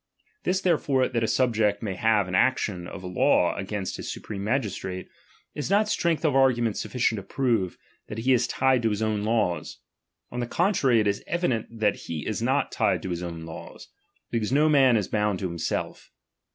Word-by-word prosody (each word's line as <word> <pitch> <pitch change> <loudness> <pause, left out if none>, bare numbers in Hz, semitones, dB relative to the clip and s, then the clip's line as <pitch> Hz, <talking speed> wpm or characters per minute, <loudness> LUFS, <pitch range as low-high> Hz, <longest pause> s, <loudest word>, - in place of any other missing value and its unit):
This 185 +1 +1
therefore, 145 -7 +2
that 115 -2 -1
a - - +1
subject 110 -4 +1
may 100 -3 -2
have 105 0 +2
an 90 - -6
action 95 -5 +1
of 95 - -8
law 90 0 +2
agaiust 100 -1 -4
his - - -5
supreme 100 -2 -6
magistrate, 100 -6 -2 0.5
is 145 - -4
not 210 +2 +3
strength 170 -6 0
of 150 - +3
argu 135 -2 +4
ment 115 -3 0
sufficient 115 -3 0
to - - -4
prove, 115 -5 -1 0.3
that 105 - -7
he 125 +4 +2
is 125 -1 +2
tied 130 0 +2
to 115 - +2
his 105 +1 -1
own 110 -1 0
laws. 110 -5 0 0.5
On 120 - -4
the 120 - -2
contrary, 145 - +2
it 105 - +1
is 100 0 -1
evident 150 -11 0
that 105 -2 +2
he 80 -3 -4
is - - -2
not - - +1
tied - - +1
to 95 - -4
his 85 0 -3
own 85 -2 -6
laws; 80 - -10 0.4
because 115 -1 -1
uo 150 +3 +4
man 135 -5 +5
is 105 - -1
bound 105 -2 0
to 95 - -2
himself. 85 -1 -4
110 Hz, 195 wpm, -26 LUFS, 100-130 Hz, 0.5 s, man